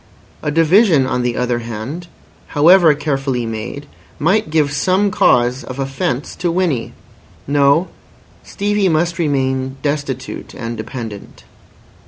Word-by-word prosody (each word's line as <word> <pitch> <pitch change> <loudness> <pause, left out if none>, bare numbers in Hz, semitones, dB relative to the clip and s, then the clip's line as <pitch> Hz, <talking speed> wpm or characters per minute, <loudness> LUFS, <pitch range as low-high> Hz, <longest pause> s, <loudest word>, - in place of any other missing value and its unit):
A - - -2
division, 165 - +4
on 125 -1 -1
the 120 -1 -1
other 125 -1 0
hand, 120 +9 -6 0.5
however 165 0 +6
carefully 135 -4 -2
made, 115 +6 -5 0.3
might 190 +4 +1
give 150 -2 +2
some 185 +7 +1
cause 125 -4 +2
of 130 - -8
offence 135 0 -3
to 175 -1 -1
Winnie. 165 -9 -1 0.5
No, 145 +5 +3 0.5
Stevie 205 -1 0
must 170 +2 0
remain 130 -3 -1
destitute 145 -3 -4
and 115 0 -5
dependent. 110 -2 -8
145 Hz, 120 wpm, -17 LUFS, 125-170 Hz, 0.5 s, however